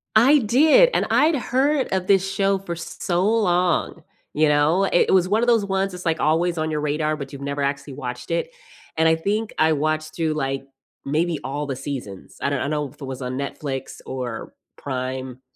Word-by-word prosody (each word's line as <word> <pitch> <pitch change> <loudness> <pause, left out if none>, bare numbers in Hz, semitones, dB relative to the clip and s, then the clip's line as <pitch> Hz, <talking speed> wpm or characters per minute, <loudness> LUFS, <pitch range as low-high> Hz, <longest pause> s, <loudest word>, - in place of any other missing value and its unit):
I 265 +7 +6
did, 300 - +5
and - - +2
I'd 310 +2 +4
heard 270 +2 +1
of 185 -1 -1
this 195 -1 +3
show 195 0 +1
for 175 -3 -5
so 175 +1 -2
long, 180 -6 +1 0.3
you 155 0 +3
know? 150 +6 +3
I - - -1
it 175 - +3
was 185 -1 +4
one 215 +3 +2
of 240 - +1
those 230 -4 +3
ones, 195 0 -1
that's, 180 0 -8
like, 165 -1 +1
always 170 +3 +1
on 155 0 -1
your 150 -1 -2
radar, 150 +1 0
but 140 -3 -7
you've 140 -1 -9
never 140 +1 -3
actually 140 0 -3
watched 125 -2 -6
it, 170 - -1 0.5
and 160 0 +4
I 160 - +4
think 205 +6 -2
I 160 0 +4
watched 155 +1 -1
through, 160 -2 0
like, 135 -2 -2 0.4
maybe 160 +2 0
all 145 +2 -3
the 140 -2 -3
seasons, 120 -9 -7
I - - +1
don't 140 -2 -1
I - - -1
don't 140 - -2
know 150 -2 -1
if 150 +3 -21
it - - -5
was 130 0 -6
on 125 0 -4
Netflix 135 -1 -5
or 125 -3 -5 0.2
Prime. 130 -1 -5
155 Hz, 210 wpm, -22 LUFS, 140-195 Hz, 0.5 s, I